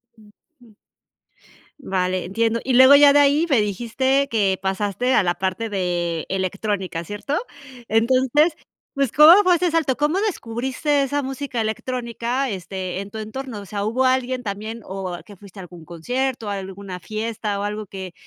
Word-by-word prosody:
Ujú. 225 +3 -23 1.0
Vale, 185 -6 -1
entiendo. 225 +5 0
Y 260 - -1
luego 260 +3 +8
ya 285 0 +7
de 290 - +5
ahí 290 +3 +4
me 260 -7 +4
dijiste 240 +7 0
que 200 -5 +1
pasaste 200 +6 -1
a - - +5
la 175 -1 0
parte 190 +4 -2
de, 175 -4 -2
electrónica, 190 -2 -3
¿cierto? 205 - -4 0.5
Entonces, 260 +8 +3 0.4
pues, 275 -4 0
¿cómo 330 +7 +8
fue 365 -2 +4
ese 360 +1 +1
salto? 320 -5 +1
¿Cómo 295 +6 0
descubriste 275 - -1
esa 285 +2 -1
música 270 -2 -4
electrónica, 240 +3 -2
este, 185 -2 -5
en 200 +1 -7
tu 220 - -6
entorno? 220 +1 -6
O - - -11
sea, 200 +1 -3
¿hubo 250 +5 +1
alguien 255 0 +1
también 215 +1 -6
o 185 -2 -5
que 205 - -14
fuiste 195 0 -14
a - - -6
algún 175 -2 -12
concierto, 245 - -3
o - - -2
a 200 - -2
alguna 190 -1 -7
fiesta, 215 +2 -4
o - - -3
algo 210 +1 -4
que 190 -2 -8
220 Hz, 170 wpm, -22 LUFS, 195-265 Hz, 1.0 s, luego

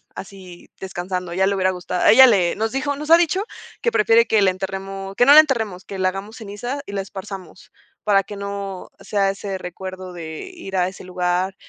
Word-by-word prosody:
así 185 -2 -11
descansando, 180 -1 -5
a - - -5
ella 190 +1 +2
le 200 - +1
hubiera 185 0 +2
gustado 180 0 -2
ella 260 +4 +9
le 190 -7 +3
nos 220 +1 -1
dijo 285 +2 -1
nos 300 +2 -7
ha 335 - +10
dicho 345 +4 +1 0.4
que 470 - +1
prefiere 230 - +4
que 220 -2 +3
la 190 - +4
enterremos, 195 +1 -6
que 245 - +4
no 280 - +8
la 305 - +11
enterremos, 220 -11 -3
que 195 - -7
la 185 - +2
hagamos 195 +4 -7
ceniza 230 +6 -5
y - - -7
la 195 - -1
esparzamos 190 -2 -9 0.3
para 200 -2 +3
que 205 +2 -9
no 200 -1 -6
sea 200 -2 0
ese 195 -1 -5
recuerdo 185 +1 -8
de 160 -2 -7
ir 195 - -6
a 180 0 +2
ese 185 - -9
lugar. 180 +1 -1
195 Hz, 210 wpm, -21 LUFS, 185-220 Hz, 0.4 s, la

